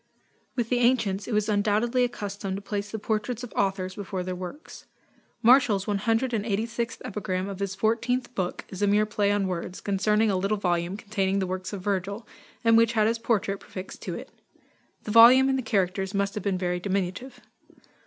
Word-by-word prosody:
With 240 -3 -1
the 245 - +2
ancients, 225 -6 +2
it - - -5
was 210 -1 +1
undoubtedly 215 +4 +2
a 245 - +2
custom 200 -3 -5
to 200 - -5
place 205 0 -3
the 220 - -4
portraits 220 +3 -2
of 245 - -8
authors 190 -2 0
before 190 -2 -4
their 185 0 -4
works. 185 - -9 0.6
Martial's 230 -5 +5
186th 225 +1 -1
epigram 190 -2 -3
of 200 -1 -6
his 195 -1 -2
fourteenth 240 +4 0
book 185 -5 -3
is 190 0 -7
a 205 - +3
mere 210 +1 +3
play 210 -1 +1
on 205 -1 +1
words, 180 0 -4
concerning 210 +2 +1
a 190 - +1
little 195 +3 0
volume 175 -1 -1
containing 200 -2 -1
the 195 - 0
works 185 0 -4
of 200 -3 -5
Virgil, 200 +2 -2 0.4
and 230 -1 +5
which 230 0 +4
had 215 -2 +3
his 230 +1 +1
portrait 200 -4 0
prefixed 185 0 -9
to - - -4
it. - - -9 0.7
The 210 - -4
volume 245 +4 +8
and 265 - +2
the - - -1
characters 195 -3 -1
must 200 0 0
have 210 - -5
been 195 -2 0
very 180 -1 -1
diminutive. 195 +7 -3
205 Hz, 190 wpm, -26 LUFS, 190-225 Hz, 0.7 s, volume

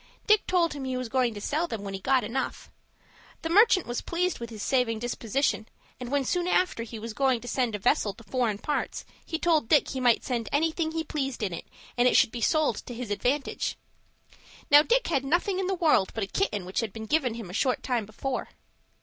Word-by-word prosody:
Dick 425 -2 +4
told 345 -3 +2
him 285 -2 -6
he 260 -1 -2
was 255 -2 -4
going 250 -2 +1
to - - -5
sell 310 +10 -1
them 225 -9 -5
when 195 -1 -5
he 195 - -4
got 260 +4 +2
enough. 235 +5 -4 0.7
The 325 - -2
merchant 410 -1 +5
was 240 0 -3
pleased 355 -1 -1
with 235 -1 -6
his 215 -3 -7
saving 250 -4 +1
disposition, 235 0 -1 0.3
and 250 -1 -6
when 280 0 0
soon 355 +5 0
after, 365 -9 +1
he 230 0 -7
was 220 +1 -6
going 260 -1 +2
to 245 - -9
send 245 -4 0
a - - -1
vessel 205 +1 +2
to 230 - -14
foreign 225 0 -1
parts, 295 +7 -3 0.2
he 320 - -3
told 320 -8 +2
Dick 295 - +4
he 265 - -3
might 245 -2 +3
send 235 -3 -2
anything 320 +2 0
he 325 0 -1
pleased 270 -6 -3
in 190 -4 -1
it, 170 - -7 0.3
and 245 - +5
it - - +4
should - - +4
be 240 - -5
sold 305 -2 +2
to 245 - -6
his 235 -3 -5
advantage. 260 +7 -1 0.9
Now 290 0 +10
Dick - - +2
had 275 -5 +1
nothing 355 +6 +1
in 380 - -1
the 385 - 0
world 310 - +3
but 220 - -1
a - - 0
kitten 210 - -1
which 185 - -2
had 225 -3 -2
been 220 -1 -6
given 255 -3 +1
him 220 -6 -7
a - - -10
short 255 +5 0
time 240 -5 -1
before." 255 +5 -4
255 Hz, 230 wpm, -27 LUFS, 225-315 Hz, 0.9 s, Now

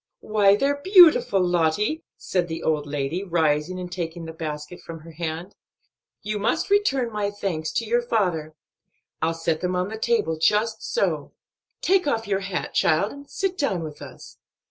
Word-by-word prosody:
"Why, 205 -2 +4
they're 285 +5 0
beautiful, 335 - +6
Lottie!" 180 - +1 0.2
said 180 -2 -1
the 160 -1 -5
old 150 -2 0
lady, 145 +5 -2
rising 165 -1 0
and 180 -1 -6
taking 170 -1 -5
the 160 - -7
basket 155 +1 -6
from 165 -1 -9
her 165 +1 -12
hand. 165 +3 -5 0.7
"You 210 0 -2
must 320 - 0
return 275 - +2
my 210 -1 -1
best 205 0 -14
thanks 160 -5 -2
to 230 - -1
your 240 +2 +2
father. 180 -10 -1 0.7
I'll 165 +1 +1
set 165 -1 -1
them 180 0 -1
on 180 +2 -1
the 220 0 -6
table 190 -10 0
just 215 +6 +2
so. 485 - -1 0.5
Take 370 -4 +2
off 225 -6 0
your 195 -1 +1
hat, 195 -2 -4
child, 165 +6 +2
and 280 0 -12
sit 385 -1 -2
down 195 - 0
with 150 -2 -8
us. - - -12
185 Hz, 175 wpm, -24 LUFS, 160-225 Hz, 0.7 s, beautiful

